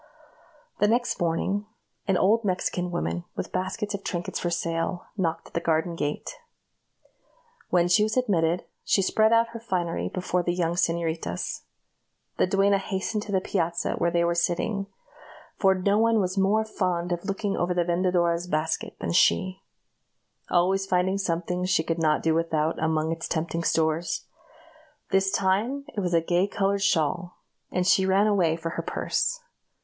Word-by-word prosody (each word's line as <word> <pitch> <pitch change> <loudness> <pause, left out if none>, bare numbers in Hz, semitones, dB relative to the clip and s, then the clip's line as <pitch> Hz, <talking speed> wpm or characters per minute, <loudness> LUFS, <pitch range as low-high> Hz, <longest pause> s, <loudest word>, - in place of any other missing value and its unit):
The 205 - +4
next 240 +3 +1
morning, 190 +5 0 0.4
an 195 -2 +3
old 220 +6 +3
Mexican 180 -2 -1
woman, 175 0 -2
with - - -4
baskets 205 +3 -2
of 200 -1 -4
trinkets 175 -1 -3
for 175 - -1
sale, 170 +1 -2
knocked 170 -5 -1
at - - -31
the - - 0
garden 165 +1 0
gate. 145 -2 -4 1.3
When 175 -1 +3
she 180 +4 +4
was 215 +3 +1
admitted, 180 -8 +1 0.2
she 195 - +2
spread 220 +3 +3
out 230 0 +4
her 230 0 -7
finery 180 -7 -2
before 180 -1 -1
the 175 0 -1
young 170 -2 0
señoritas. 165 - -1 0.8
The - - +3
duenna 195 +1 +3
hastened 195 +2 -2
to - - -5
the 190 -1 +2
piazza 170 -3 -1
where 170 - +1
they 170 0 +1
were 170 0 +2
sitting 195 +4 -1 0.7
for 190 -1 +3
no 200 +3 +2
one 225 0 +3
was 185 -1 -1
more 205 +3 +2
fond 180 -4 -1
of 175 -1 -2
looking 195 0 -2
over 175 +1 0
the 175 - +2
vendedora's 175 -1 +1
basket 155 -1 -1
than - - -2
she, 185 +2 +3 0.9
always 190 +2 +2
finding 185 +1 +1
something 180 -1 -1
she 180 -3 +2
could 165 +1 -2
not 155 -2 +2
do 160 - +3
without 160 -1 0
among 160 0 +1
its 165 0 -3
tempting 165 +1 -2
stores 160 +1 0 0.9
this 195 0 +3
time 200 +9 0
it - - -1
was 180 -3 0
a 165 - +4
gay 175 +3 +1
colored 200 0 0
shawl, 175 -1 0 0.3
and 180 0 0
she 190 +1 +4
ran 195 +2 +4
away 185 -6 +2
for 165 0 -4
her - - -3
purse. - - -1
180 Hz, 165 wpm, -26 LUFS, 170-195 Hz, 1.3 s, The